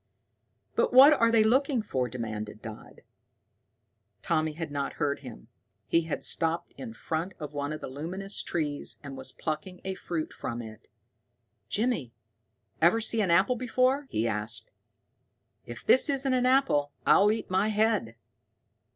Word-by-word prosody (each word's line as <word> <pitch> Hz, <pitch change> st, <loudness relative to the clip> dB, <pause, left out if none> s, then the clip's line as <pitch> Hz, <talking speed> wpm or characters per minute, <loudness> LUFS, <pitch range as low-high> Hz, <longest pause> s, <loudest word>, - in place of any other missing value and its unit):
"But -, -, +1 dB
what 270 Hz, +4 st, +9 dB
are 230 Hz, -5 st, +3 dB
they 230 Hz, -1 st, +5 dB
looking 255 Hz, +1 st, +2 dB
for?" 130 Hz, -, -2 dB
demanded 110 Hz, -3 st, -5 dB
Dodd. 110 Hz, -1 st, -10 dB, 1.2 s
Tommy 155 Hz, -2 st, 0 dB
had 160 Hz, -1 st, -5 dB
not 140 Hz, -1 st, -2 dB
heard 145 Hz, -2 st, -1 dB
him. -, -, -11 dB, 0.4 s
He 165 Hz, -1 st, +2 dB
had 160 Hz, -, -4 dB
stopped 165 Hz, +1 st, -1 dB
in 230 Hz, -3 st, -8 dB
front 165 Hz, +4 st, -3 dB
of 150 Hz, -2 st, -7 dB
one 145 Hz, 0 st, -3 dB
of 155 Hz, -, -5 dB
the -, -, -5 dB
luminous 180 Hz, +9 st, -4 dB
trees 150 Hz, -4 st, -2 dB
and 140 Hz, -1 st, -7 dB
was 130 Hz, 0 st, -4 dB
plucking 165 Hz, +4 st, -5 dB
a 190 Hz, -, -2 dB
fruit 170 Hz, -4 st, -4 dB
from 120 Hz, -, -5 dB
it. 110 Hz, -2 st, -10 dB, 0.8 s
"Jimmy, 205 Hz, -, -1 dB, 0.7 s
ever 175 Hz, +7 st, +5 dB
see 225 Hz, 0 st, +1 dB
an 195 Hz, -, 0 dB
apple 190 Hz, +9 st, +4 dB
before?" 255 Hz, +3 st, +1 dB
he 115 Hz, +2 st, 0 dB
asked. 110 Hz, +1 st, -3 dB, 1.0 s
"If 120 Hz, -, -9 dB
this 260 Hz, -, +4 dB
isn't 270 Hz, -1 st, 0 dB
an 250 Hz, 0 st, +2 dB
apple, 255 Hz, -, +3 dB
I'll 205 Hz, +1 st, +6 dB
eat 220 Hz, -3 st, -3 dB
my 190 Hz, +3 st, +2 dB
head." 215 Hz, -, +1 dB
170 Hz, 150 wpm, -28 LUFS, 140-225 Hz, 1.2 s, what